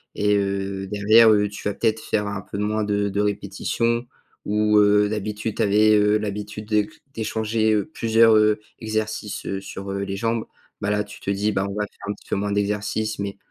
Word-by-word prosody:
et 105 Hz, 0 st, +2 dB
heu, 100 Hz, -1 st, -2 dB
derrière, 110 Hz, +3 st, +5 dB
heu, 105 Hz, -1 st, +3 dB
tu 105 Hz, -, -6 dB
vas 105 Hz, -, -2 dB
peut-être 110 Hz, -1 st, 0 dB
faire 105 Hz, -, -1 dB
un 100 Hz, -1 st, -4 dB
peu 100 Hz, -, -8 dB
moins 105 Hz, +1 st, 0 dB
de 100 Hz, 0 st, 0 dB
de 100 Hz, +1 st, -1 dB
répétition 105 Hz, +4 st, -1 dB, 0.4 s
ou 105 Hz, 0 st, +2 dB
heu, 105 Hz, 0 st, +4 dB
d'habitude, 105 Hz, +1 st, -3 dB
tu -, -, 0 dB
avais, 105 Hz, +1 st, +4 dB
heu, 105 Hz, 0 st, +4 dB
l'habitude 105 Hz, 0 st, -5 dB
d'éc 105 Hz, -1 st, +2 dB, 0.2 s
d'échanger, 110 Hz, 0 st, 0 dB
heu, 105 Hz, -, +1 dB
plusieurs, 115 Hz, 0 st, +4 dB
heu, 105 Hz, 0 st, +3 dB, 0.2 s
exercices, 110 Hz, -1 st, -3 dB
heu, 95 Hz, -, -3 dB
sur, 95 Hz, 0 st, -7 dB
heu, 100 Hz, -, -3 dB
les 100 Hz, 0 st, -4 dB
jambes, 115 Hz, +2 st, -1 dB, 0.4 s
bah, 105 Hz, -, -1 dB
là, 105 Hz, 0 st, +1 dB
tu 105 Hz, 0 st, -12 dB
te -, -, -5 dB
dis: 100 Hz, +2 st, +1 dB
«Ben, 95 Hz, -1 st, 0 dB
on -, -, -5 dB
va 105 Hz, 0 st, -1 dB
faire -, -, -20 dB
un 105 Hz, -, -1 dB
petit -, -, -19 dB
peu -, -, 0 dB
moins 100 Hz, +1 st, -2 dB
d'exercices 105 Hz, +1 st, -1 dB
mais 100 Hz, 0 st, -4 dB
105 Hz, 210 wpm, -23 LUFS, 100-110 Hz, 0.4 s, derrière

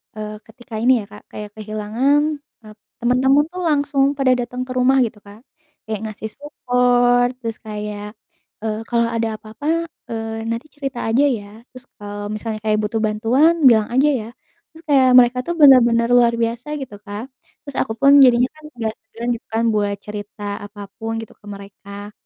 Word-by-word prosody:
eee, 215 Hz, 0 st, -5 dB, 0.2 s
ketika 230 Hz, +1 st, -16 dB
ini 250 Hz, -, +5 dB
ya -, -, -9 dB
Kak, 210 Hz, -, -13 dB
kayak 210 Hz, -1 st, -7 dB
kehilangan, 220 Hz, +7 st, 0 dB, 0.4 s
eee, 215 Hz, 0 st, -12 dB, 0.3 s
temen-temen 265 Hz, +4 st, +3 dB
tuh 365 Hz, -, -6 dB
langsung 285 Hz, -2 st, +1 dB
pada 265 Hz, -2 st, +3 dB
datang 250 Hz, +1 st, -4 dB
ke -, -, -7 dB
rumah 260 Hz, +2 st, +4 dB
gitu 220 Hz, -1 st, -7 dB
Kak. 205 Hz, +2 st, -14 dB, 0.4 s
Kayak 215 Hz, -2 st, -4 dB
ngasih 215 Hz, +1 st, -7 dB
support 245 Hz, -3 st, +2 dB
terus 225 Hz, -1 st, -4 dB
kayak, 210 Hz, 0 st, -6 dB, 0.5 s
eee, 215 Hz, -1 st, -2 dB
"Kalau 235 Hz, -1 st, +2 dB
ada 230 Hz, 0 st, 0 dB
apa-apa, 220 Hz, +7 st, -11 dB, 0.4 s
eee, 225 Hz, 0 st, -4 dB
nanti 230 Hz, +5 st, -3 dB
cerita 275 Hz, -4 st, -5 dB
aja 255 Hz, +6 st, +3 dB
ya. 225 Hz, -7 st, -2 dB, 0.2 s
Terus 255 Hz, 0 st, -14 dB
kalau 205 Hz, 0 st, -6 dB
misalnya 215 Hz, 0 st, -4 dB
kayak 215 Hz, 0 st, +2 dB
butuh 220 Hz, +1 st, -1 dB
bantuan 230 Hz, +10 st, +3 dB
bilang 220 Hz, -3 st, +5 dB
aja 280 Hz, +4 st, +4 dB
ya." 215 Hz, -, -8 dB, 0.4 s
Terus 325 Hz, +1 st, -16 dB
kayak 265 Hz, -2 st, +5 dB
mereka 245 Hz, 0 st, +3 dB
tuh 345 Hz, -, 0 dB
bener-bener 240 Hz, -5 st, +6 dB
luar 240 Hz, -1 st, +5 dB
biasa 230 Hz, +3 st, -2 dB
gitu 225 Hz, -6 st, -8 dB
Kak. 210 Hz, +4 st, -6 dB, 0.4 s
Terus 285 Hz, -2 st, -10 dB
aku 220 Hz, -, -2 dB
pun 275 Hz, 0 st, +5 dB
jadinya 250 Hz, +1 st, +5 dB
kan 310 Hz, -, -18 dB
agak 225 Hz, -2 st, -2 dB
segan 235 Hz, +1 st, -8 dB
gitu 225 Hz, -, -13 dB
kan 225 Hz, +1 st, +1 dB
buat 205 Hz, -1 st, 0 dB
cerita 210 Hz, 0 st, -8 dB, 0.2 s
apapun 205 Hz, +2 st, -8 dB
gitu 225 Hz, -, -11 dB
ke 210 Hz, -, -21 dB
mereka, 200 Hz, 0 st, -10 dB
230 Hz, 175 wpm, -20 LUFS, 215-255 Hz, 0.5 s, bener-bener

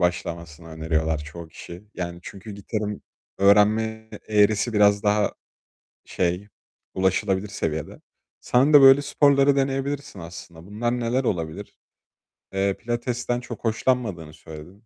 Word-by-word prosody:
başlamasını 85 Hz, -2 st, -3 dB
öneriyorlar 80 Hz, 0 st, -1 dB
çoğu 80 Hz, +3 st, -9 dB
kişi. 85 Hz, +3 st, -11 dB
Yani 85 Hz, -1 st, -5 dB
çünkü 100 Hz, +4 st, -10 dB
gitarın 105 Hz, +1 st, -4 dB, 0.4 s
öğrenme 110 Hz, +3 st, +3 dB, 0.2 s
eğrisi 105 Hz, +1 st, +3 dB
biraz 100 Hz, -1 st, +4 dB
daha 105 Hz, 0 st, +2 dB, 0.7 s
şey, 90 Hz, +3 st, -2 dB, 0.5 s
ulaşılabilir 95 Hz, +1 st, 0 dB
seviyede. 80 Hz, -5 st, -4 dB, 0.4 s
Sen 135 Hz, +5 st, +2 dB
de 145 Hz, -, +9 dB
böyle 135 Hz, +1 st, +8 dB
sporları 140 Hz, -1 st, +3 dB
deneyebilirsin 135 Hz, -3 st, -2 dB
aslında. 85 Hz, 0 st, -11 dB
Bunlar 120 Hz, +4 st, -2 dB
neler 120 Hz, +3 st, 0 dB
olabilir? 80 Hz, -8 st, -3 dB, 0.8 s
Eee, 95 Hz, 0 st, +1 dB
pilatesten 120 Hz, +1 st, -2 dB
çok 120 Hz, -2 st, -9 dB
hoşlanmadığını 110 Hz, -9 st, -1 dB
söyledin. 80 Hz, +7 st, -13 dB
105 Hz, 115 wpm, -24 LUFS, 85-120 Hz, 0.8 s, de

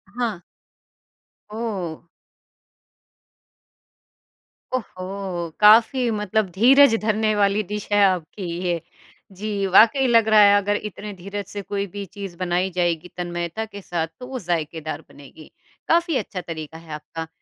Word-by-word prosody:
हाँ। 235 Hz, -6 st, -2 dB, 1.1 s
ओह! 200 Hz, -8 st, -5 dB, 2.7 s
ओहो! 185 Hz, -6 st, -5 dB
काफ़ी 230 Hz, +4 st, +6 dB
मतलब 210 Hz, -1 st, 0 dB
धीरज 250 Hz, +6 st, +6 dB
धरने 215 Hz, 0 st, +1 dB
वाली 200 Hz, 0 st, +2 dB
डिश 210 Hz, +1 st, -6 dB
है 205 Hz, 0 st, +5 dB
आपकी 185 Hz, +1 st, -1 dB, 0.2 s
ये। 170 Hz, -2 st, -1 dB, 0.5 s
जी, 200 Hz, +1 st, -3 dB
वाक़ई 230 Hz, +8 st, +5 dB
लग 230 Hz, -2 st, +4 dB
रहा 215 Hz, -1 st, +6 dB
है 200 Hz, 0 st, +7 dB
अगर 205 Hz, +1 st, 0 dB
इतने 210 Hz, 0 st, -6 dB
धीरज 200 Hz, +2 st, -6 dB
से 205 Hz, 0 st, -6 dB
कोई 200 Hz, 0 st, -3 dB
भी 200 Hz, +2 st, -7 dB
चीज़ 195 Hz, -1 st, -8 dB
बनाई 180 Hz, +1 st, 0 dB
जाएगी 175 Hz, -1 st, 0 dB
तन्मयता 175 Hz, +3 st, -3 dB
के 205 Hz, -2 st, -10 dB
साथ, 170 Hz, -3 st, -2 dB
तो 250 Hz, -, -8 dB
वो 260 Hz, 0 st, -5 dB
ज़ायकेदार 160 Hz, -4 st, -3 dB
बनेगी, 145 Hz, +2 st, -15 dB, 0.4 s
काफ़ी 335 Hz, -3 st, +2 dB
अच्छा 185 Hz, -7 st, -4 dB
तरीका 160 Hz, -2 st, -7 dB
है 165 Hz, -1 st, -13 dB
आपका। 160 Hz, +2 st, -7 dB
200 Hz, 130 wpm, -22 LUFS, 175-215 Hz, 2.7 s, है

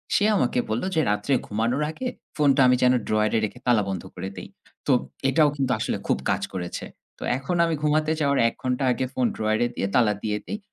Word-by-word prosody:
সে 205 Hz, -, +3 dB
আমাকে 125 Hz, -7 st, +1 dB
বললো 110 Hz, +10 st, -1 dB
যে 160 Hz, -, +4 dB
রাত্রে 105 Hz, +7 st, 0 dB
ঘুমানোর 115 Hz, +7 st, 0 dB
আগে 255 Hz, +11 st, -5 dB, 0.3 s
ফোনটা 140 Hz, -3 st, +4 dB
আমি 125 Hz, -, +5 dB
যেন 125 Hz, 0 st, +5 dB
ড্রয়ারে 110 Hz, +1 st, +2 dB
রেখে 120 Hz, +4 st, -8 dB
তালা 115 Hz, -4 st, +4 dB
বন্ধ 95 Hz, -2 st, -3 dB
করে 95 Hz, +2 st, -5 dB
দেই। -, -, -7 dB, 0.4 s
তো -, -, +3 dB, 0.4 s
এটাও 150 Hz, +1 st, +4 dB
কিন্তু 135 Hz, -3 st, 0 dB
আসলে -, -, -1 dB
খুব -, -, +2 dB
কাজ -, -, +1 dB
করেছে। 90 Hz, -2 st, -4 dB, 0.3 s
তো -, -, -6 dB
এখন 135 Hz, +7 st, -3 dB
আমি 165 Hz, -, 0 dB
ঘুমাতে 155 Hz, +1 st, +2 dB
যাওয়ার 140 Hz, -1 st, +2 dB
১ -, -, -2 dB
ঘন্টা 130 Hz, +1 st, 0 dB
আগে 130 Hz, +1 st, -1 dB
ফোন 130 Hz, -, +1 dB
ড্রয়ারে 110 Hz, +2 st, +1 dB
দিয়ে 100 Hz, -, -1 dB
তালা 115 Hz, -4 st, +4 dB
দিয়ে 105 Hz, -1 st, -1 dB
দেই। 210 Hz, -, -4 dB
125 Hz, 205 wpm, -24 LUFS, 110-145 Hz, 0.4 s, আমি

